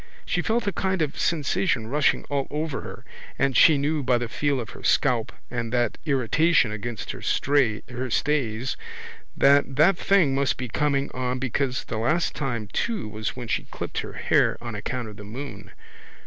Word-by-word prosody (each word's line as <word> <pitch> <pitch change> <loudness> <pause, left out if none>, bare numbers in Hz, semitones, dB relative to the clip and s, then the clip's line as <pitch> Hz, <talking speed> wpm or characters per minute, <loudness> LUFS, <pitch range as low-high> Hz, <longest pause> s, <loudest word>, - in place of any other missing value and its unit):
She - - 0
felt 235 +1 0
a 200 - 0
kind 190 -1 0
of 145 - -2
a - - -10
sensation 165 - +1
rushing 140 +5 +2
all 140 -2 -2
over 150 -1 -3
her - - -9 0.3
and 135 -1 +1
she 155 -3 +7
knew 150 +2 0
by 125 -2 +2
the 120 0 -3
feel 140 +3 0
of 120 -1 -6
her - - -11
scalp 125 -5 +2 0.2
and 115 -2 -3
that 120 -1 0
irritation 140 0 +3
against 110 +2 -5
her - - -9
stays 130 -1 0 0.6
that 140 -1 +4
that 170 +6 +5
thing 180 -9 +3
must 140 0 +1
be 125 -1 -4
coming 140 +2 0
on 125 0 -2
because 130 0 -1
the 110 - -4
last 155 +10 +1
time 120 -7 -3
too 225 - -1
was 110 0 -4
when 125 -2 -6
she - - -1
clipped - - -4
her - - -6
hair - - +2
on 120 -1 -6
account 120 +3 -4
of 105 -1 -10
the 105 - -9
moon. 130 +7 -8
135 Hz, 180 wpm, -25 LUFS, 120-150 Hz, 0.6 s, she